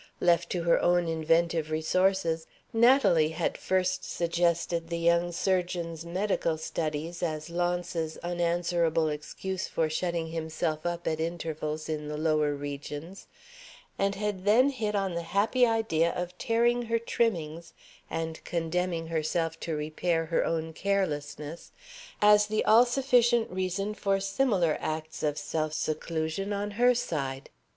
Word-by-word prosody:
Left 170 -1 +3
to 175 -2 -2
her 170 - +3
own 175 -1 +3
inventive 165 0 +1
resources, 165 +1 +1 0.3
Natalie 225 - +5
had 170 - 0
first 185 0 0
suggested 170 0 0
the 170 - -2
young 170 +1 +2
surgeon's 175 -2 -1
medical 180 -2 0
studies 160 +1 -3
as 155 -1 -3
Launce's 175 -2 -1
unanswerable 170 -2 +1
excuse 185 +6 -4
for 160 -1 -1
shutting 170 0 -1
himself 160 0 -2
up 170 0 -3
at 160 -1 0
intervals 160 -2 -3
in 150 -1 -3
the 150 0 -4
lower 155 -2 +1
regions, 145 +5 -7 0.7
and 200 0 +1
had 205 -2 -3
then 230 +7 +5
hit 215 -6 -2
on 195 -2 0
the 170 - -2 0.2
happy 245 +5 +4
idea 220 -8 +2
of 180 0 -4
tearing 240 +1 +2
her 230 0 +1
trimmings, 170 -9 -2 0.4
and 160 0 -4
condemning 170 0 -1
herself 165 +1 -1
to 165 - -3
repair 165 +2 -1
her 165 +1 +1
own 160 -1 -2
carelessness, 160 -4 -2 0.5
as 210 0 +6
the 215 0 0
all 230 +3 +7
sufficient 240 -2 +3
reason 190 +3 -2
for 195 -2 0
similar 195 - +1
acts 155 0 -4
of 150 -1 0
self 155 -1 -2
seclusion 160 +5 -2
on 205 +1 -2
her 245 +4 +4
side. 135 - -3
170 Hz, 135 wpm, -28 LUFS, 160-195 Hz, 0.7 s, all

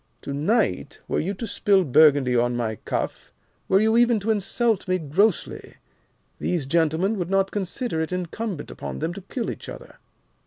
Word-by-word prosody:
To 140 - -4
night, 160 - 0
were - - 0
you 195 +5 -2
to 230 - -5
spill 200 -2 +2
Burgundy 140 -3 +4
on 120 0 +2
my 110 -3 -2
cuff, - - -3 0.4
were 190 - +4
you 220 +1 +3
even 240 -2 +4
to 220 +3 0
insult 215 +1 0
me 185 0 +2
grossly, 180 +3 0 0.6
these 170 -6 -1
gentlemen 165 +7 +1
would 175 -1 -3
not 195 0 +1
consider 200 -1 -2
it 160 - -3
incumbent 180 0 -4
upon - - -6
them 160 +3 -2
to 200 - -8
kill 230 +5 -4
each - - -9
other. - - -11
185 Hz, 170 wpm, -24 LUFS, 155-215 Hz, 0.6 s, Burgundy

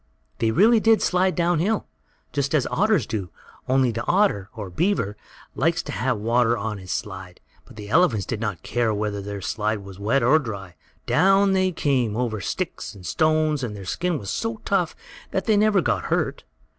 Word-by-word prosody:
They 115 - +2
really 215 - +5
did 225 0 +4
slide 185 0 +1
down 175 -1 +2
hill, 210 +6 0 0.5
just 140 +1 0
as 140 - +2
otters 205 - +2
do, 100 -5 -4 0.4
only 130 -1 +3
the 115 +1 -4
otter, 175 - +2
or 105 -5 -6
beaver, 135 - 0 0.4
likes 165 +5 +1
to 145 - -6
have 130 -4 -1
water 120 +2 +2
on 105 0 -4
his 90 -1 -12
slide, 95 -3 -5 0.3
and - - -15
the 105 -1 -8
elephants 115 - +3
did 115 - -3
not 105 -7 -3
care 115 -3 0
whether 105 -1 -2
their 100 0 -6
slide 105 +1 -2
was 95 -1 -11
wet 115 +6 +1
or 140 +7 +5
dry. 100 - -7 0.3
Down 195 +3 +4
they 185 -1 +2
came, 130 -9 0
over 115 -4 -1
sticks - - -4
and 95 -3 -12
stones, 155 - +1
and 110 -4 -4
their 100 -2 -8
skin 175 - -1
was 100 -7 -5
so 225 -1 -3
tough 185 -5 0 0.3
that 190 - -2
they 215 - +3
never 205 -2 +4
got 110 - 0
hurt. - - -1
125 Hz, 190 wpm, -23 LUFS, -, 0.5 s, really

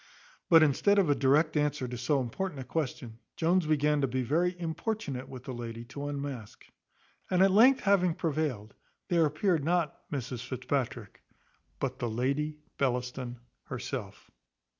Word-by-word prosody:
But 165 -2 +8
instead 180 +8 +3
of 185 -7 +4
a - - +3
direct 150 +4 +3
answer 145 -3 0
to 125 - -5
so 135 +4 +1
important 145 +6 -4
a - - -4
question, 125 -5 -4 0.2
Jones 170 0 +2
began 150 -1 +2
to 135 - +2
be 130 +1 -1
very 175 +7 +1
importunate 165 - -3
with 130 -2 -9
the 130 - -6
lady 115 -1 -6
to 145 0 -4
unmask; 140 -6 -6 0.6
and 185 0 +4
at 195 - +5
length 250 +7 +6
having 185 -4 +3
prevailed, 150 - -2 0.4
there 170 -3 +4
appeared 155 +1 +1
not 170 -1 -1
Mrs 125 -3 -4
Fitzpatrick, 130 -4 -3 0.6
but - - -3
the 120 - -1
Lady 140 +6 -1 0.2
Bellaston 125 -2 -2 0.2
herself. - - -6
145 Hz, 150 wpm, -30 LUFS, 125-165 Hz, 0.6 s, But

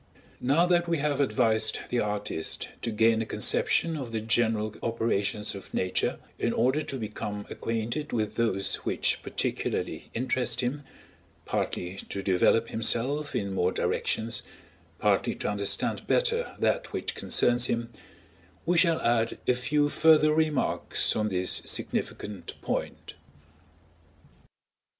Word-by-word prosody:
Now 145 +7 +3
that 175 -1 +2
we 170 -1 +1
have 145 -1 0
advised 115 -5 +2
the 125 - +1
artist 105 -6 -2
to - - -1
gain 110 +1 +3
a - - -2
conception 165 -1 +2
of 130 -6 -5
the 110 - -1
general 110 -1 +1
operations 115 -2 0
of 100 - -10
Nature, 90 0 0 0.2
in - - +1
order 130 +6 +2
to 135 -3 -3
become 105 -2 -5
acquainted 115 +6 -3
with 110 -3 -1
those 115 -4 0
which - - 0
particularly - - -2
interest 130 +1 +1
him, 130 +4 -2 0.6
partly 90 +2 -2
to 100 - -4
develop 100 +5 +3
himself 125 +6 0
in 100 -1 -1
more 90 -1 +2
directions, 115 +3 0 0.6
partly - - +2
to - - -3
understand 100 -1 -2
better 485 -1 +1
that - - 0
which - - -2
concerns 120 0 +1
him; 115 -1 -2 0.7
we 175 0 +3
shall 165 -2 +4
add 115 -1 +1
a - - +5
few 145 +4 +1
further 155 0 +5
remarks 155 -3 +1
on 110 0 +1
this 90 -2 0
significant 100 -5 -4
point. - - -3
115 Hz, 130 wpm, -28 LUFS, 105-145 Hz, 0.7 s, a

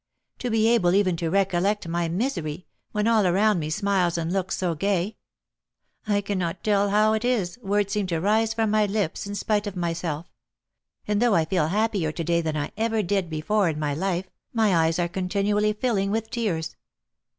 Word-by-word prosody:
to 250 - -2
be 220 -1 +3
able 200 -7 +3
even 190 -3 +3
to 165 0 -2
recollect 195 +1 +1
my 170 0 -1
misery, 175 - -2 0.3
when 210 0 0
all 220 -4 +4
around 200 +2 +3
me 155 -1 -3
smiles 185 -1 +1
and 165 +1 -2
looks 190 -1 -1
so 180 -2 0
gay! 195 +4 -1 0.9
I 205 -1 +2
cannot 185 -3 -3
tell 205 -1 +2
how 215 +2 +3
it 220 +1 -1
is, 240 -5 0
words 200 -1 0
seem 205 -2 0
to 165 -3 -1
rise 215 +5 +2
from 220 -1 0
my 215 -1 +3
lips 200 -2 -2
in 205 - -5
spite 210 0 0
of 200 - -5
myself; 170 -2 -3 0.8
and, 210 +1 +1
though 240 -4 +4
I 160 - +3
feel 160 -2 +1
happier 200 -3 0
to 165 - -3
day 170 +1 +1
than 155 -2 -2
I 145 - -3
ever 225 -1 0
did 190 -1 0
before 175 +5 +1
in 155 - -3
my 150 -1 -1
life, 185 +3 -1 0.3
my 220 -5 +2
eyes 165 0 +2
are 175 -1 +1
continually 200 +4 0
filling 210 -3 0
with 220 +1 -2
tears! 205 -10 -2
195 Hz, 195 wpm, -25 LUFS, 170-210 Hz, 0.9 s, all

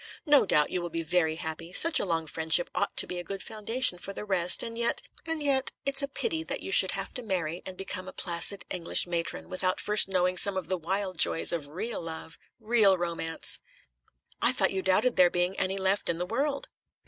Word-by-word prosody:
"No 290 - +4
doubt 150 -3 +2
you 180 - -2
will 175 - -5
be 165 0 -4
very 160 -1 0
happy. 160 +1 -7
Such 330 - +8
a - - -1
long 165 -3 -2
friendship 160 +2 +1
ought - - -2
to - - +6
be 180 - -6
a - - -6
good 195 +2 -7
foundation 220 -2 +1
for 195 - -6
the 210 - -7
rest, 180 -3 +2
and 230 -1 -6
yet 235 0 -2 0.2
and 325 -2 -4
yet 270 -2 0
it's 275 +1 +3
a 280 - -2
pity 320 +3 -3
that 325 - -5
you - - -7
should - - +6
have - - -6
to 250 - -5
marry 180 -6 -3
and 185 -1 -9
become 185 -1 -6
a - - -7
placid 175 +3 +1
British 175 -2 +1
matron 170 -1 -4
without 185 0 -1
first 210 -1 +3
knowing 180 -1 0
some 195 +1 +2
of 180 -4 -5
the 190 - 0
wild 185 +1 -4
joys 165 - +4
of 155 -4 -4
real 185 +10 -5
love, 160 -1 -9 0.2
real 215 -4 +3
romance." 170 -2 -2 0.8
"I - - +4
thought - - +1
you 190 - -2
doubted 205 +7 +1
there 180 -1 +5
being 180 +2 -2
any 190 +1 -2
left 190 +1 -1
in 165 - -1
the 175 - -3
world?" 275 +8 -3
185 Hz, 220 wpm, -27 LUFS, 170-215 Hz, 0.8 s, Such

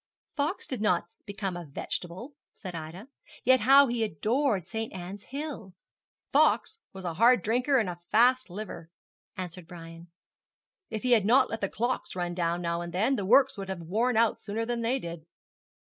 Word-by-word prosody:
'Fox 310 +6 -1
did 255 -5 -4
not 180 -5 +2 0.2
become 200 -2 -4
a 175 - -6
vegetable,' 180 - -6 0.2
said 185 -3 -8
Ida; 165 +7 -8 0.4
'yet 260 +1 +5
how 275 +5 +7
he 240 -3 -1
adored 215 - 0
St. 225 +2 -4
Ann's 190 +2 -8
Hill!' 275 -9 -6 0.6
'Fox 440 - +3
was 190 -2 -9
a 170 - -2
hard 235 +7 +4
drinker 250 +5 +2
and 220 -6 +1
a 175 -1 -6
fast 250 +1 +4
liver,' 180 -3 -7 0.5
answered 180 -2 -6
Brian. 165 0 -11 0.8
'If 220 -2 -5
he 250 - +1
had 225 -4 +5
not 250 +4 +4
let 225 - -4
the 200 - 0
clock 240 +4 -1
run 175 -1 -2
down 175 0 -1
now 170 0 -1
and 175 0 -6
then, 215 +10 +1
the 200 -6 -3
works 265 0 +5
would 195 -1 -6
have 190 -2 -4
worn 220 +8 0
out 230 -1 +3
sooner 220 +2 -3
than 240 0 -2
they 235 +3 +1
did.' 170 -8 -8
210 Hz, 180 wpm, -28 LUFS, 175-245 Hz, 0.8 s, how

